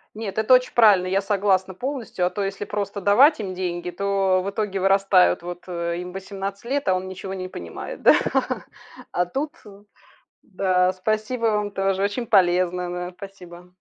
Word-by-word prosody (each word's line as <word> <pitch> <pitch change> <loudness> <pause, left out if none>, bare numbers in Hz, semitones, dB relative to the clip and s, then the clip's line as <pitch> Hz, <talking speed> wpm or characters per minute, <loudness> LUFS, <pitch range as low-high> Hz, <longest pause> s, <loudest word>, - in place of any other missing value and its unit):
Нет, 215 -2 -6
это 220 +4 +4
очень 250 0 +4
правильно, 205 -6 +5
я 195 +2 +1
согласна 195 -2 +1
полностью, 245 -5 -3
а 180 - +2
то 205 - -3
если 195 +1 -4
просто 205 0 -4
давать 240 - +5
им 190 -3 -4
деньги, 175 -1 -4
то 195 0 +1
в 200 - -2
итоге 200 -2 -3
вырастают. 195 -2 +4
Вот, 175 0 -7
э, 170 0 -3
им 180 0 -7
18 195 +2 -6
лет, 280 0 -2
а 185 - +3
он 185 +1 -4
ничего 190 +1 -7
не 185 -1 -5
понимает, 85 - -8
да? - - +7 1.0
А 180 - +1
тут, 280 - -3
э, 200 0 -14 0.6
да, 185 -2 +1
спасибо 215 +5 -2
вам 210 -1 0
тоже. 195 0 -1
Очень 205 +4 -1
полезно, 180 -2 +2
да. 180 0 -5
Спасибо! 180 -3 -11
195 Hz, 175 wpm, -23 LUFS, 180-205 Hz, 1.0 s, да